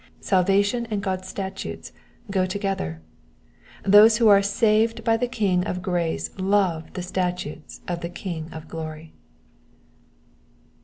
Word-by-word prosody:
Salva 195 +1 +3
tion 235 +3 -2
and 205 -2 -2
God's 185 -2 -3
statutes 190 0 -6 0.4
go 185 -2 +1
together: 185 - -3 0.8
those 210 +3 +7
who 230 -1 +4
are 200 -1 +7
saved 220 +3 +2
by 225 0 +3
the 245 +2 0
King 200 -8 +1
of 180 0 -3
grace 175 -3 -1
love 185 -4 +1
the 180 - -4
statutes 180 -4 -4
of 175 -1 -2
the 170 - -4
King 170 -3 -6
of 160 0 -9
glory. 160 0 -7
190 Hz, 135 wpm, -24 LUFS, 175-205 Hz, 0.8 s, those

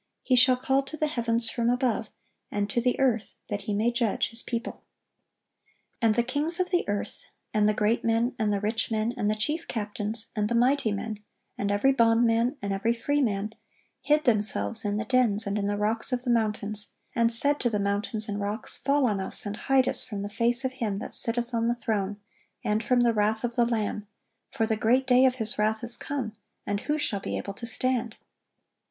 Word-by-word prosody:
He 255 - +3
shall 255 0 +6
call 265 +2 +1
to 275 +3 -8
the 310 - +1
heavens 235 -5 +1
from 235 -1 0
above, 245 -4 0 0.4
and 205 0 -1
to 240 - +1
the 250 +1 +1
earth, 240 -5 +1
that 205 -1 -3
He - - +1
may 225 +4 +2
judge 235 -3 0
His 230 +1 -1
people."(1107) 235 -1 -5 1.2
"And 225 -2 +3
the 235 - +3
kings 300 +7 +2
of 365 0 0
the 355 - +2
earth, 205 - -4 0.3
and 210 -1 +3
the 210 - +1
great 215 +3 +1
men, 230 +2 +1
and 215 -1 +1
the 200 - 0
rich 220 +2 -1
men, 220 +1 -1
and 210 -5 0
the 215 - +1
chief 300 +10 -2
captains, 215 0 -3
and 210 -1 0
the 235 - 0
mighty 245 -1 +2
men, 210 +1 -4 0.4
and 200 - -2
every 205 +7 +3
bondman, 230 +1 +3
and 200 -1 -1
every 220 +4 +1
freeman, 225 -6 -1 0.5
hid 300 0 +2
themselves 220 0 +1
in 205 0 0
the 220 - -2
dens 225 -3 +2
and 200 +1 -1
in 200 - -1
the 205 0 -1
rocks 220 +4 0
of 250 -1 -1
the 250 - 0
mountains; 215 -2 -1 0.2
and 230 -1 +3
said 285 +5 +2
to 240 - +1
the 215 - -1
mountains 205 +2 -1
and 205 -1 -3
rocks, 205 +3 -2
Fall 280 0 +2
on 210 -5 0
us, 190 - +5
and 205 0 -3
hide 265 +2 +2
us - - 0
from 205 -5 -5
the 205 - -4
face 235 +4 +1
of 260 - 0
Him 220 -6 -2
that - - -7
sitteth 240 +1 -1
on 230 0 +1
the 240 - +1
throne, 210 -4 -2 0.5
and 210 +2 0
from 245 +2 +2
the 235 -1 +3
wrath 215 +1 0
of 240 0 -2
the 240 0 +3
Lamb: 215 -3 -2 0.4
for 225 - -1
the 220 0 0
great 240 +5 +2
day 255 0 +5
of 255 -1 +3
His 220 -4 -2
wrath 220 +2 +1
is 235 0 -2
come; 260 -7 -4 0.3
and 205 0 -1
who 300 +7 -1
shall 210 -9 -1
be - - -4
able 200 - -5
to 235 +4 -8
stand?" 240 -1 -1
230 Hz, 215 wpm, -27 LUFS, 210-250 Hz, 1.2 s, shall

